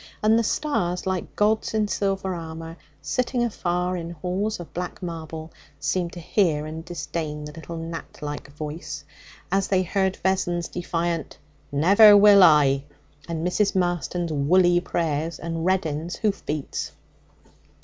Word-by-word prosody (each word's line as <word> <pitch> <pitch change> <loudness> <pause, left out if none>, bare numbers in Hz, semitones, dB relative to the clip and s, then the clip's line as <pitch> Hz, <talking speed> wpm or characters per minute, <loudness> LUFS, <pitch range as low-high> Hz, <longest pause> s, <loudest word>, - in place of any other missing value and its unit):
And 220 +1 +5
the - - +1
stars, 180 - -1
like 190 -2 -3
gods 215 +1 +1
in 215 -1 +2
silver 195 -2 -1
armour 165 -1 -7 0.3
sitting 250 -1 0
afar 180 -5 -1
in 170 -2 -5
halls 180 +6 -2
of 175 - -10
black 180 +2 -5
marble, 160 -2 -6 0.3
seemed 175 -2 -1
to 175 - -7
hear 160 -4 +1
and 160 +1 -6
disdain 160 -3 -4
the 150 - -7
little 165 +2 -8
gnat 165 0 -7
like 145 -1 -6
voice, 150 +1 -6 0.5
as 195 0 +2
they 185 -1 +2
heard 190 +1 0
Vessons' 175 -3 0
defiant 170 -1 -2 0.3
'Never 200 +8 +7
will 200 -1 +8
I!' 145 -5 +6 0.4
and 165 -1 -3
Mrs. 195 +3 +1
Marston's 175 -2 -1
woolly 175 +5 +4
prayers, 165 -2 -2
and 165 0 -4
Reddin's 170 -3 0
hoof 200 -4 -1
beats. 150 -2 -3
175 Hz, 140 wpm, -24 LUFS, 160-190 Hz, 0.5 s, will